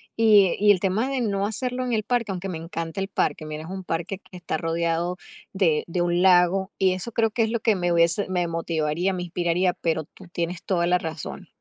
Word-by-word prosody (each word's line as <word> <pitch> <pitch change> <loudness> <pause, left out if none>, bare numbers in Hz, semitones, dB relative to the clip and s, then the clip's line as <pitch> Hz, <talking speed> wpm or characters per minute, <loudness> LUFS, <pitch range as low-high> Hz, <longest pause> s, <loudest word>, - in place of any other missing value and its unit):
Y 210 -5 +5
y 205 0 +6
el 190 - +3
tema 200 +7 0
de 270 -2 -1
no 200 -3 0
hacerlo 250 +4 -2
en 245 - -2
el 215 -2 +1
parque, 240 -3 0
aunque 190 +1 -4
me 170 - -4
encanta 165 +1 -5
el 195 - -1
parque, 155 - -1
mira, 155 0 -6
es 160 - -9
un 190 0 -6
parque 175 +4 -3
que 190 - -17
está 170 -2 -3
rodeado 170 +2 -1 0.4
de 165 -6 +2
de 175 +1 -1
un 175 0 +1
lago, 190 +1 +4
y 190 -1 +3
eso 185 +5 -5
creo 225 -1 +2
que 225 +2 +1
es 220 - 0
lo 235 - 0
que 220 -1 +2
me 175 -2 0
hubiese 170 +4 +3
me 180 -2 0
motivaría, 165 +2 -1
me 180 -1 -3
inspiraría, 175 +1 0
pero 160 -2 -1
tú 185 +5 -16
tienes 170 0 -3
toda 170 -3 +1
la 180 +1 +4
razón, 160 -3 -6
180 Hz, 235 wpm, -24 LUFS, 170-200 Hz, 0.4 s, y